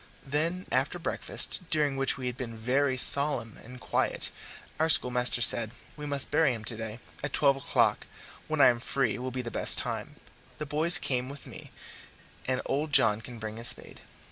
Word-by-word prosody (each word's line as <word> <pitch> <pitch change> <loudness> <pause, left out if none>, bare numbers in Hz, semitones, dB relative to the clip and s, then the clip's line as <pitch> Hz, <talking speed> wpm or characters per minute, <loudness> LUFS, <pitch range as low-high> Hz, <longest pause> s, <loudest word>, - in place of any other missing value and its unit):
Then, 165 +6 -3
after 135 +7 -1
breakfast, 175 - -4
during 150 -3 0
which 135 +1 -1
we 130 - -7
had 125 -1 -4
been 120 -3 -8
very 130 +4 -1
solemn 130 -4 +7
and 125 +2 -13
quiet, - - -2 0.5
our 160 +1 +1
schoolmaster 125 -4 +3
said: 115 -3 +3 0.3
"We 150 -1 -8
must 140 -1 -2
bury 150 -4 +1
him 110 - -10
today 110 0 -6 0.3
at 145 - -5
twelve 140 -2 +2
o'clock, 135 +1 -1 0.4
when - - -1
I - - +7
am 120 -1 -1
free, 125 -1 -2
will 130 +1 -5
be 130 0 -6
the 120 - -7
best - - +1
time; - - -5 0.4
the 150 - -6
boys 155 +3 +2
can 125 -4 -3
come - - -10
with 140 0 -9
me, - - -13 0.8
and 130 0 -2
old 150 +2 -3
John 115 -6 +4
can 120 -1 -11
bring 110 -1 -8
his 115 +1 -4
spade." - - -6
130 Hz, 190 wpm, -27 LUFS, 120-145 Hz, 0.8 s, solemn